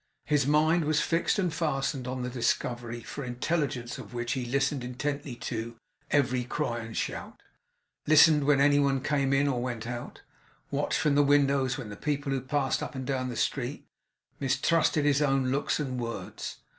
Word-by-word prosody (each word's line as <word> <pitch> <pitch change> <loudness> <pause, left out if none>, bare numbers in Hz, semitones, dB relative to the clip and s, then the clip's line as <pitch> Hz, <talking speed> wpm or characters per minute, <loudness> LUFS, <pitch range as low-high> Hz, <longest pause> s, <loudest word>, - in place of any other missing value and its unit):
His 145 -3 +2
mind 155 +3 +3
was 155 0 +2
fixed 165 +4 +1
and 180 -5 0
fastened 135 -5 -1
on 130 0 -3
the 125 - -2
discovery, 120 -1 -1
for 140 - -7
intelligence 125 -1 -2
of - - -10
which 120 0 -2
he 125 -2 -2
listened 135 +1 0
intently 140 +2 -3
to 115 0 -5 0.3
every 130 -3 +2
cry 120 -1 -2
and 115 -1 -7
shout; - - -4 0.6
listened 155 -1 +6
when 145 -1 +4
any 145 +1 +5
one 135 -2 +2
came 140 -2 +1
in 135 +1 +3
or 125 -3 0
went 120 -3 -4
out; 120 0 -6 0.5
watched - - 0
from 150 - +2
the 145 - +5
window 140 -1 +3
the 125 -5 -4
people 145 +3 -2
who 135 -1 0
passed 135 +1 0
up - - -5
and 130 -1 -4
down 130 -1 -1
the 120 - -5
street; - - -2 0.5
mistrusted 145 +3 +2
his 145 0 +3
own 135 -3 +2
looks 140 +3 0
and 130 -4 -3
words. 115 -1 -5
135 Hz, 175 wpm, -28 LUFS, 125-145 Hz, 0.6 s, listened